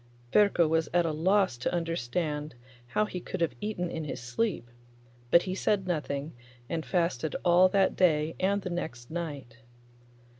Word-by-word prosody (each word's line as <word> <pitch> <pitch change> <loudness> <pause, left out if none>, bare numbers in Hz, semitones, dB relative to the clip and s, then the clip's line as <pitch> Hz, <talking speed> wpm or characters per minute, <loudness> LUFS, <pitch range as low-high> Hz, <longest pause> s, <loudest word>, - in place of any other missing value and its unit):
Ferko 200 -5 +5
was 160 +1 +1
at 175 -1 +4
a 165 - 0
loss 185 -1 +2
to 125 - -2
understand 155 -3 -2 0.3
how 210 +13 +1
he 185 - -5
could 185 - -6
have 165 -6 +1
eaten 205 -4 -2
in 160 - -4
his 150 - -5
sleep, 125 - -2 0.6
but 170 +7 +6
he 185 - -3
said 195 0 0
nothing, 150 -3 -3 0.3
and 160 +3 -2
fasted 170 -5 0
all 180 +1 +6
that 195 0 +2
day 160 -3 +3
and 200 +1 +1
the 180 - -4
next 120 -7 -5
night. 145 -8 -5
170 Hz, 160 wpm, -29 LUFS, 150-185 Hz, 0.6 s, but